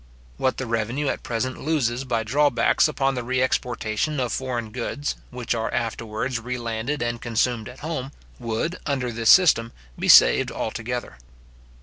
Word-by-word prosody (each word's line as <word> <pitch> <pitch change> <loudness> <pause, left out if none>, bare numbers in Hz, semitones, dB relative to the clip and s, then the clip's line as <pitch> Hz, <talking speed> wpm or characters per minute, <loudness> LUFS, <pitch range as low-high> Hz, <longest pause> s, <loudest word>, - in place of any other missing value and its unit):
What 130 -1 0
the 130 - -3
revenue 120 +5 -1
at - - -3
present 125 +2 -3
loses 135 -5 0
by 115 -3 0
drawbacks 130 +2 +3
upon 135 -3 0
the 125 -2 -3
re 130 +2 -1
exportation 125 +2 -1
of 125 -2 -1
foreign 120 -4 -3
goods, 130 +5 -3
which 125 -1 -3
are 115 -1 -2
afterwards 115 +1 -2
re 125 +2 -4
landed 120 +4 -3
and 120 0 -3
consumed 120 -1 0
at 125 - -13
home, 145 -4 -4 0.3
would, 120 +9 -2
under 130 -4 -1
this 115 0 0
system, 130 -11 +6 0.3
be - - -2
saved - - +7
altogether. 120 - -4
125 Hz, 155 wpm, -24 LUFS, 115-135 Hz, 0.3 s, saved